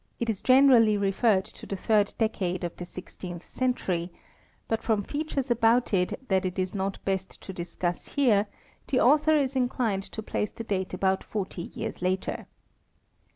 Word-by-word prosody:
is 225 Hz, -4 st, -1 dB
generally 255 Hz, -5 st, +6 dB
referred 195 Hz, 0 st, +2 dB
to -, -, -12 dB
the 195 Hz, -, -3 dB
third 205 Hz, +1 st, +2 dB
decade 185 Hz, -5 st, -1 dB
of 175 Hz, -, -3 dB
the 175 Hz, -, -6 dB
sixteenth 175 Hz, -1 st, -8 dB
century, 185 Hz, -9 st, -1 dB, 0.6 s
but 225 Hz, -, -1 dB
from 215 Hz, -3 st, +1 dB
features 285 Hz, -1 st, -3 dB
about 235 Hz, 0 st, +3 dB
it 190 Hz, +8 st, 0 dB
that 190 Hz, -1 st, +2 dB
it 185 Hz, 0 st, -3 dB
is 185 Hz, -1 st, -1 dB
not 195 Hz, -1 st, -2 dB
best 190 Hz, -1 st, -2 dB
to 190 Hz, -, -8 dB
discuss 175 Hz, 0 st, -3 dB
here 225 Hz, -8 st, +4 dB, 0.4 s
the 255 Hz, -, +2 dB
author 305 Hz, +4 st, +5 dB
is 275 Hz, -2 st, 0 dB
inclined 245 Hz, -5 st, 0 dB
to 220 Hz, +2 st, -8 dB
place 210 Hz, -, -2 dB
the 230 Hz, -, -8 dB
date 190 Hz, -4 st, -2 dB
about 190 Hz, +1 st, +1 dB
forty 190 Hz, -4 st, -4 dB
years -, -, -5 dB
later. 185 Hz, +1 st, -2 dB
205 Hz, 160 wpm, -27 LUFS, 185-245 Hz, 0.6 s, generally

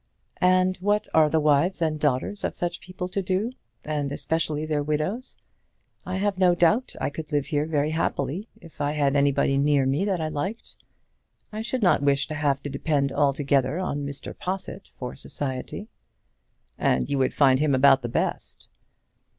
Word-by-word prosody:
"And 185 Hz, 0 st, +3 dB
what 205 Hz, +3 st, 0 dB
are 155 Hz, -1 st, +5 dB
the 160 Hz, -, +2 dB
wives 155 Hz, +5 st, +2 dB
and 155 Hz, -2 st, 0 dB
daughters 150 Hz, +8 st, -1 dB
of -, -, -2 dB
such 175 Hz, -1 st, -3 dB
people 185 Hz, 0 st, -6 dB
to 195 Hz, -, -2 dB
do, 190 Hz, +5 st, -1 dB, 0.3 s
and 150 Hz, -2 st, -2 dB
especially 155 Hz, 0 st, -1 dB
their 155 Hz, -2 st, 0 dB
widows? 155 Hz, -, -1 dB, 0.7 s
I 185 Hz, -, -2 dB
have 195 Hz, -1 st, -1 dB
no 180 Hz, -2 st, +5 dB
doubt 175 Hz, +9 st, +2 dB
I -, -, -1 dB
could 160 Hz, +1 st, -7 dB
live 145 Hz, -2 st, +1 dB
here 150 Hz, -1 st, -1 dB
very 150 Hz, -1 st, 0 dB
happily 160 Hz, -, -2 dB
if 165 Hz, -3 st, -12 dB
I 145 Hz, +1 st, 0 dB
had 145 Hz, -2 st, +1 dB
anybody 140 Hz, -1 st, +2 dB
near 145 Hz, -1 st, +3 dB
me 135 Hz, +7 st, +1 dB
that 195 Hz, -4 st, 0 dB
I 155 Hz, -1 st, -2 dB
liked. 190 Hz, +10 st, -4 dB, 0.8 s
I 215 Hz, 0 st, -4 dB
should 235 Hz, +1 st, -2 dB
not 180 Hz, -, +4 dB
wish 140 Hz, -1 st, +2 dB
to -, -, -3 dB
have 145 Hz, -2 st, 0 dB
to -, -, -3 dB
depend 140 Hz, -1 st, 0 dB
altogether 140 Hz, 0 st, +1 dB
on 145 Hz, -6 st, -2 dB
Mr. 140 Hz, 0 st, -4 dB
Possitt 190 Hz, +1 st, -5 dB
for 125 Hz, -1 st, -6 dB
society." 135 Hz, +9 st, -5 dB, 0.9 s
"And -, -, +1 dB
you 140 Hz, -1 st, -1 dB
would 130 Hz, -, +1 dB
find 130 Hz, -2 st, +5 dB
him 150 Hz, -2 st, +2 dB
about 135 Hz, 0 st, +5 dB
the 120 Hz, -, -4 dB
best." -, -, -3 dB
150 Hz, 175 wpm, -25 LUFS, 140-185 Hz, 0.9 s, are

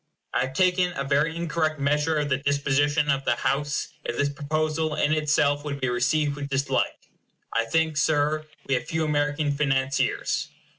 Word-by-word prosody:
I 130 Hz, -, +1 dB
have 130 Hz, -, -11 dB
taken 180 Hz, 0 st, +2 dB
a 140 Hz, -, -3 dB
very 145 Hz, +4 st, +1 dB
incorrect 160 Hz, -2 st, -1 dB
measure 150 Hz, +3 st, +1 dB
of 150 Hz, -1 st, 0 dB
the 130 Hz, -, +2 dB
disposition 145 Hz, +1 st, +1 dB
of 135 Hz, 0 st, 0 dB
the -, -, +2 dB
House 145 Hz, +1 st, -1 dB
if -, -, -4 dB
this 145 Hz, -, +2 dB
proposal 155 Hz, +2 st, -1 dB
in 150 Hz, -, +2 dB
itself 145 Hz, -2 st, +2 dB
would 140 Hz, -2 st, -4 dB
be 130 Hz, -2 st, 0 dB
received 140 Hz, +4 st, +1 dB
with 145 Hz, -1 st, -5 dB
dislike. 140 Hz, 0 st, -1 dB, 0.5 s
I 115 Hz, 0 st, +1 dB
think, 160 Hz, +5 st, +1 dB
Sir, 155 Hz, 0 st, +1 dB, 0.2 s
we 135 Hz, -, 0 dB
have 125 Hz, -, 0 dB
few 160 Hz, -1 st, -1 dB
American 145 Hz, 0 st, 0 dB
financiers. 135 Hz, -2 st, 0 dB
145 Hz, 170 wpm, -25 LUFS, 140-155 Hz, 0.5 s, taken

